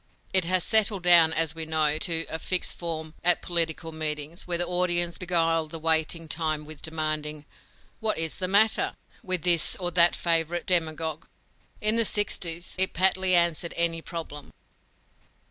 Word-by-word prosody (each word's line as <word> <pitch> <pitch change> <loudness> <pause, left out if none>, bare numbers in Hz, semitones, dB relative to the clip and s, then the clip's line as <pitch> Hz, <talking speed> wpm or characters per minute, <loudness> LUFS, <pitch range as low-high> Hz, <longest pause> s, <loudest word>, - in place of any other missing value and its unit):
It 190 -2 +5
has 185 0 +1
settled 215 -4 +3
down, 170 -2 +6
as 160 -1 +3
we 165 0 -5
know, 155 -1 +1
to 165 0 +1
a 160 - -5
fixed 185 +1 -2
form 160 -2 -6
at 175 0 +2
political 165 -2 -2
meetings, 155 +1 -5
where 175 -1 -1
the 175 - -1
audience 175 -1 0
beguile 165 -3 0
the 165 +2 -7
waiting 160 +1 -1
time 155 -1 -3
with 155 -1 -12
demanding 155 -1 -4 0.5
"What 220 -1 -2
is 160 -1 -2
the 185 - -2
matter?" 215 +3 +2 0.3
with 185 -3 -3
this 170 -2 +2
or 175 -2 -4
that 175 0 +5
favorite 170 0 -1
demagogue. 160 -3 0 0.5
In 215 +2 +2
the 230 - +4
sixties, 175 -5 -1
it 190 - +2
patly 185 0 +3
answered 170 -1 0
any 170 -1 0
problem. 160 -4 -8
165 Hz, 160 wpm, -25 LUFS, 160-180 Hz, 0.5 s, down